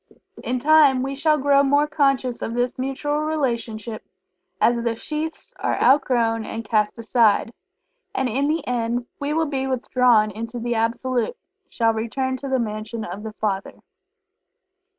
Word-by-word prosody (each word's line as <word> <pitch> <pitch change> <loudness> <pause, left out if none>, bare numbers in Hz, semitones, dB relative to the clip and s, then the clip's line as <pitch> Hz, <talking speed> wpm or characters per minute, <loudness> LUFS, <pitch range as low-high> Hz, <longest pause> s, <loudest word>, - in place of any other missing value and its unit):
In 255 - -1
time 285 -2 +5
we 270 +1 -3
shall 305 +2 +2
grow 280 0 +4
more 285 +1 +3
conscious 275 -4 0
of 230 - -3
this 245 +1 -1
mutual 275 +3 -1
relationship, 235 -8 -2 0.6
as 240 - +4
the 235 -1 -1
sheaths 310 +6 -5
are - - -1
outgrown 235 -5 +3
and 225 +1 -6
cast 210 0 +1
aside, 230 -1 +2 0.6
and 265 - +1
in 270 +4 0
the 310 -1 -1
end 240 0 -1
we 285 +1 -2
will 320 +1 +1
be 270 -3 -2
withdrawn 250 -4 +3
into 230 +3 -6
the 240 0 -2
Absolute 235 +1 -1 0.3
shall 225 -1 +1
return 260 +4 -2
to 275 - -7
the 265 - +2
Mansion 215 -1 -4
of 190 +2 -7
the 220 0 -7
Father. 200 -2 -3
245 Hz, 150 wpm, -22 LUFS, 225-275 Hz, 0.6 s, time